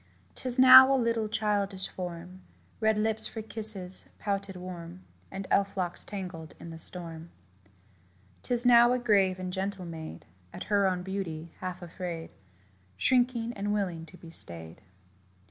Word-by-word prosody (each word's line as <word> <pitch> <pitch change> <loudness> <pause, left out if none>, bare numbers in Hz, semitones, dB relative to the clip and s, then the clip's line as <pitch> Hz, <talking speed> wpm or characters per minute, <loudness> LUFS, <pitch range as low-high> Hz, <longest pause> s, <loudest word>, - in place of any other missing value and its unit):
'Tis 255 -1 -1
now 260 +1 +10
a 270 - +4
little 230 -3 0
childish 205 -3 -1
form 180 0 -8 0.4
Red 220 -1 +2
lips 220 +1 +2
for 220 - -7
kisses 210 -4 +1
pouted 200 -1 -3
warm 180 0 -9 0.3
And 195 0 -6
elf 200 0 +1
locks 175 -2 -3
tangled 180 -6 -8
in 170 - -9
the 165 - -9
storm. 165 -1 -3 1.1
'Tis 245 0 0
now 240 0 +7
a - - +1
grave 200 -6 +2
and 185 -1 -5
gentle 190 -1 -4
maid, 160 - -8 0.3
At - - -6
her 200 -1 +4
own 180 -1 -1
beauty 170 -4 -5
half 185 -1 -6
afraid, 170 -1 -6 0.7
Shrinking, 240 - +1
and 205 0 -2
willing 175 -5 -3
to 180 - -15
be 165 -2 -13
stayed. 85 - -3
190 Hz, 145 wpm, -29 LUFS, 175-220 Hz, 1.1 s, now